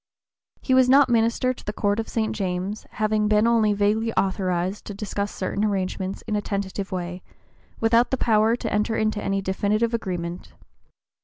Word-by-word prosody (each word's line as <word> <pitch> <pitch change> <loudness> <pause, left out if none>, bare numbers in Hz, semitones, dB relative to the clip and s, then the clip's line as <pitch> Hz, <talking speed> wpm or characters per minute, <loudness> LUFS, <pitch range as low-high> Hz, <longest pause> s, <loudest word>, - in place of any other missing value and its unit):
He 260 - +1
was 255 -1 +5
not 275 0 +6
minister 235 +2 +2
to - - -14
the 210 - -3
Court 205 0 0
of 225 - -4
St. 220 -1 -1
James, 190 +1 -3
having 215 0 +1
been 210 +1 +3
only 230 -2 +3
vaguely 210 +3 +1
authorized 185 0 -1
to 205 - -7
discuss 205 0 -3
certain 195 +2 -2
arrangements 190 -2 -2
in 210 - -3
a 205 - 0
tentative 200 -1 -4
way, 180 0 -4 0.6
without 230 +2 +3
the 265 - 0
power 220 -1 +3
to - - -4
enter 210 +2 +1
into 215 -1 0
any 195 0 -1
definitive 210 +4 0
agreement. 180 -5 -4
210 Hz, 170 wpm, -24 LUFS, 195-225 Hz, 0.6 s, not